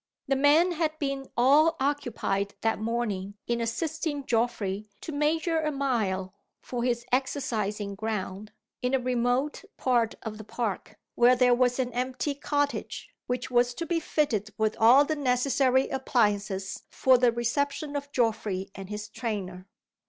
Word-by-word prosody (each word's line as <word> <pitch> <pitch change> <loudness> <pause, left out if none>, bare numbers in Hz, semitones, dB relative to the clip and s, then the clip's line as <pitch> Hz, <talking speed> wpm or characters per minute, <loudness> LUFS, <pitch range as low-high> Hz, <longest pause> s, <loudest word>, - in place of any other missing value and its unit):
The 275 - +2
men 295 +6 +5
had 315 -2 -1
been 275 -2 -3
all 295 +7 +5
occupied 240 -8 -1
that 225 -2 +1
morning 215 -4 -2
in 235 0 -1
assisting 290 +4 -2
Geoffrey 215 -4 -1
to - - -6
measure 315 +3 +1
a 305 -1 0
mile, 215 -10 -1 0.3
for 245 -2 -4
his 240 -1 0
exercising 220 -6 -1
ground, 210 -1 -4 0.3
in 250 +2 +1
a - - +2
remote 250 +3 0
part 240 -3 +1
of 220 -1 -6
the - - -7
park 215 -2 -4 0.2
where 245 +1 +5
there 250 0 +4
was 250 0 +2
an 250 -2 -1
empty 255 +3 -1
cottage, 285 0 -2
which 250 +1 -3
was 245 0 +3
to 335 - -3
be 335 0 0
fitted 245 -10 0
with 220 0 +1
all 245 +6 +7
the 310 - -1
necessary 260 -1 +2
appliances 205 -7 0
for 260 -1 +4
the 245 -1 +4
reception 285 +5 -1
of 285 0 -4
Geoffrey 215 -6 -1
and 195 -1 -9
his 210 0 -5
trainer. 200 -5 -5
245 Hz, 150 wpm, -27 LUFS, 215-280 Hz, 0.3 s, all